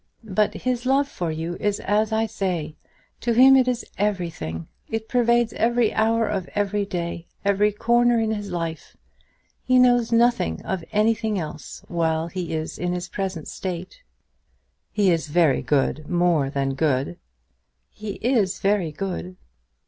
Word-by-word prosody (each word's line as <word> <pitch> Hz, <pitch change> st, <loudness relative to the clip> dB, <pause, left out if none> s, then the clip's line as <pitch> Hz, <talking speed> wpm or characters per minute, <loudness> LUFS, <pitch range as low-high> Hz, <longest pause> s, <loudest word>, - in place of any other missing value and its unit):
But 210 Hz, +2 st, +2 dB
his 255 Hz, 0 st, -2 dB
love 275 Hz, +2 st, +3 dB
for 175 Hz, -11 st, -4 dB
you 165 Hz, +2 st, -4 dB
is 205 Hz, -1 st, 0 dB
as 210 Hz, +2 st, +1 dB
I 220 Hz, 0 st, +2 dB
say. 180 Hz, -8 st, -3 dB, 0.4 s
To 235 Hz, -, 0 dB
him 260 Hz, +3 st, +8 dB
it 260 Hz, -1 st, +4 dB
is 250 Hz, -1 st, -1 dB
everything. 170 Hz, -, -2 dB, 0.2 s
It 225 Hz, 0 st, -3 dB
pervades 235 Hz, -1 st, +2 dB
every 235 Hz, -1 st, +2 dB
hour 225 Hz, 0 st, +2 dB
of 195 Hz, -4 st, -3 dB
every 205 Hz, 0 st, 0 dB
day, 170 Hz, -2 st, -4 dB, 0.2 s
every 200 Hz, +1 st, +3 dB
corner 240 Hz, +3 st, +3 dB
in 220 Hz, -1 st, 0 dB
his 205 Hz, -2 st, -4 dB
life! 165 Hz, -2 st, -5 dB, 0.7 s
He 255 Hz, 0 st, +3 dB
knows 245 Hz, -2 st, +4 dB
nothing 230 Hz, -, +2 dB
of 190 Hz, -3 st, -2 dB
anything 220 Hz, 0 st, +1 dB
else 155 Hz, -3 st, -7 dB
while 165 Hz, -1 st, 0 dB
he 180 Hz, -1 st, -4 dB
is 155 Hz, 0 st, -4 dB
in 180 Hz, 0 st, -1 dB
his 180 Hz, 0 st, -4 dB
present 190 Hz, -5 st, -4 dB
state." 185 Hz, -, -6 dB, 0.9 s
"He 200 Hz, -3 st, +3 dB
is 165 Hz, -2 st, 0 dB
very 150 Hz, -3 st, +3 dB
good; 145 Hz, +3 st, 0 dB
more 175 Hz, -5 st, +2 dB
than 135 Hz, -1 st, -1 dB
good." 135 Hz, -, 0 dB, 0.7 s
"He 215 Hz, -2 st, -6 dB
is 225 Hz, -7 st, +2 dB
very 195 Hz, -5 st, +1 dB
good." 185 Hz, +2 st, -5 dB
195 Hz, 150 wpm, -23 LUFS, 165-225 Hz, 0.9 s, him